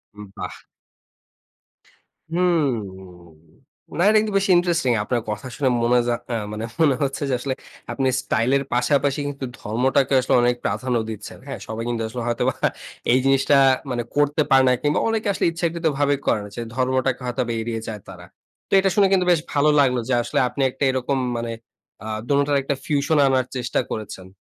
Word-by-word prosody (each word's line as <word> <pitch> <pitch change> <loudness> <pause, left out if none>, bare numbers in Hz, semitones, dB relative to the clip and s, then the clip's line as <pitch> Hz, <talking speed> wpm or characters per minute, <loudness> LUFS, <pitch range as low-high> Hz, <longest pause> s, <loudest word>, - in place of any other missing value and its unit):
উম 105 0 -9
বাহ! - - -5 1.8
হুম। 170 -7 +2 1.2
না, - - 0
এটা 215 - +5
কিন্তু 215 -1 -3
বেশ 195 - +1
ইন্টারেস্টিং, 170 -6 +2
আপনার 120 +1 -1
কথা 105 +4 -4
শুনে 140 -3 +1
মনে 120 +1 +4
যা, 120 - +2
অ্যা 120 - -1
মানে 110 +1 -4 0.2
মনে 145 -4 +4
হচ্ছে 135 +2 -2
যে, - - 0
আসলে 130 +1 -2 0.4
আপনি 135 -1 0
স্টাইল 115 -1 0
এর 140 - -2
পাশাপাশি 140 +3 +1
কিন্তু 140 -2 -5
ধর্মটাকে 130 +5 +1
আসলে 130 - 0
অনেক 120 0 +2
প্রাধান্য 120 +4 0
দিচ্ছেন। 110 -2 -8
হ্যাঁ? - - -6
সবাই 110 +1 -4
কিন্তু 115 -1 -2
আসলে 120 +2 -6
হয়তোবা 120 -1 0 0.6
এই 125 - +5
জিনিসটা, 135 +1 +3 0.4
মানে 120 -1 -1
করতে 145 +1 +2
পারে 135 0 +6
না, - - +5
কিংবা 145 +2 +1
অনেকে 220 -1 -1
আসলে - - -1
ইচ্ছাকৃতভাবে 160 -4 0
করে - - +2
না 105 - -9
যে, 120 - -4
ধর্মটাকে 130 0 0
হয়তোবা 125 -1 -2
এড়িয়ে 115 0 -3
যায় 110 -2 -5
তারা। 90 -2 -11 0.4
তো - - -36
এটা 195 0 +2
শুনে 200 -2 +5
কিন্তু 185 -1 +3
বেশ 170 - +4
ভালো 145 +1 +3
লাগলো 130 -3 +3
যে, - - +2
আসলে - - -1
আপনি 125 +3 -4
একটা 130 - -5
এরকম 130 +1 -1 0.2
মানে, 115 0 -3 0.5
আ - - -9 0.2
দোনোটার 140 0 +2
একটা 140 +1 -1
ফিউশন 145 +1 +1
আনার 130 -1 +2
চেষ্টা 125 -1 -1
করেছেন। 100 -3 -6
130 Hz, 175 wpm, -22 LUFS, 120-145 Hz, 1.8 s, পারে